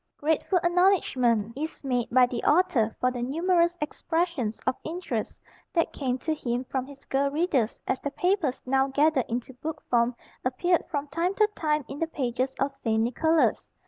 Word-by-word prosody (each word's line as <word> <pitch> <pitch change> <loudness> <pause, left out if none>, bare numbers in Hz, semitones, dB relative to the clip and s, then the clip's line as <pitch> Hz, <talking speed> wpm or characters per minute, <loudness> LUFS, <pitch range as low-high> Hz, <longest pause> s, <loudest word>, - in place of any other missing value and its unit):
Grateful 320 +5 +1
acknowledgment 260 - +2
is 310 +3 -5
made 250 -3 0
by 255 +1 +6
the 245 -1 -4
author 265 -10 +3
for 250 - +2
the 245 -1 -5
numerous 340 +6 +2
expressions 320 -6 -1
of 260 - +2
interest 350 +3 -4 0.3
that 335 -2 +1
came 255 -3 -1
to 315 +5 -2
him 245 -4 -2
from 260 0 -3
his 280 0 -14
girl 275 +1 +1
readers 285 - 0
as 260 - -1
the 285 - -2
papers 355 -4 0
now 265 +1 +2
gathered 280 -1 +2
into 240 +3 -3
book 305 +5 -5
form 240 0 +3 0.3
appeared 340 +8 +1
from 290 -2 -2
time 340 +6 -1
to 425 - +4
time 300 -3 0
in 280 - -7
the 330 - 0
pages 260 -3 -2
of 275 +1 +1
St. 225 -5 -1
Nicholas. 320 +7 +2
275 Hz, 175 wpm, -27 LUFS, 250-330 Hz, 0.3 s, by